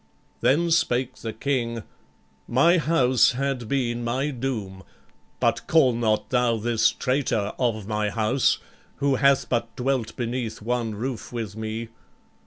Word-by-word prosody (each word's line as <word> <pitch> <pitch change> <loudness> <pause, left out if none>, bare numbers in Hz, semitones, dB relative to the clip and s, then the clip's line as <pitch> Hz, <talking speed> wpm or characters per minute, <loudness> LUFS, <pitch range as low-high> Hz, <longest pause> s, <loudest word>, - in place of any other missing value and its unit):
Then 150 +8 +2
spake 130 -6 +1
the 115 - -5
King: 115 -2 -2 0.6
"My 170 +9 +4
house 130 -6 +3
had 130 -2 -2
been 120 -2 -1
my 130 +5 -1
doom, 115 -8 -4 0.6
But - - 0
call 145 -6 +4
not 110 -2 0
thou 125 -2 +2
this 115 +1 +2
traitor 125 -6 -1
of 115 -5 0
my 105 -1 0
house 115 +5 +2 0.4
Who 140 -1 +1
hath 140 0 +3
but 115 -1 -2
dwelt 125 -3 -1
beneath 120 -2 -3
one 115 -1 -2
roof 120 +2 -5
with 110 -4 -5
me. 110 +1 -4
120 Hz, 135 wpm, -25 LUFS, 110-135 Hz, 0.6 s, My